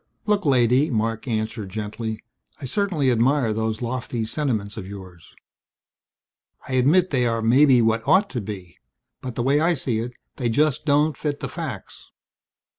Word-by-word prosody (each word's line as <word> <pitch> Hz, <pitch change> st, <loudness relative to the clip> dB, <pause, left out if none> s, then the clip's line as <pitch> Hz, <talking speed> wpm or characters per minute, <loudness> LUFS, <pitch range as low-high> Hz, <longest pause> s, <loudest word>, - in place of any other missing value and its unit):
"Look, 205 Hz, -5 st, +1 dB
lady," 130 Hz, +2 st, +3 dB
Marc 115 Hz, 0 st, -1 dB
answered 110 Hz, -3 st, -3 dB
gently, 110 Hz, +2 st, -4 dB, 0.4 s
"I 140 Hz, -, -6 dB
certainly 160 Hz, -4 st, 0 dB
admire 120 Hz, 0 st, +2 dB
those 110 Hz, +1 st, -2 dB
lofty 120 Hz, -1 st, -3 dB
sentiments 110 Hz, -6 st, -2 dB
of 100 Hz, -4 st, -7 dB
yours. 95 Hz, -4 st, -11 dB, 1.3 s
I -, -, -5 dB
admit 155 Hz, +9 st, +3 dB
they 125 Hz, -4 st, +2 dB
are 115 Hz, -1 st, -1 dB
maybe 125 Hz, +1 st, +5 dB
what 115 Hz, 0 st, +1 dB
ought 195 Hz, +2 st, +4 dB
to 120 Hz, -, -3 dB
be. 95 Hz, -4 st, -8 dB, 0.4 s
But 125 Hz, -2 st, -6 dB
the 120 Hz, -, -1 dB
way 140 Hz, +3 st, +3 dB
I 170 Hz, +2 st, +2 dB
see 125 Hz, -5 st, -2 dB
it 120 Hz, +2 st, -4 dB, 0.2 s
they 125 Hz, -3 st, -1 dB
just 150 Hz, +4 st, +1 dB
don't 150 Hz, +1 st, +3 dB
fit 145 Hz, -2 st, -3 dB
the -, -, -4 dB
facts. 155 Hz, -, -7 dB
120 Hz, 160 wpm, -23 LUFS, 110-145 Hz, 1.3 s, maybe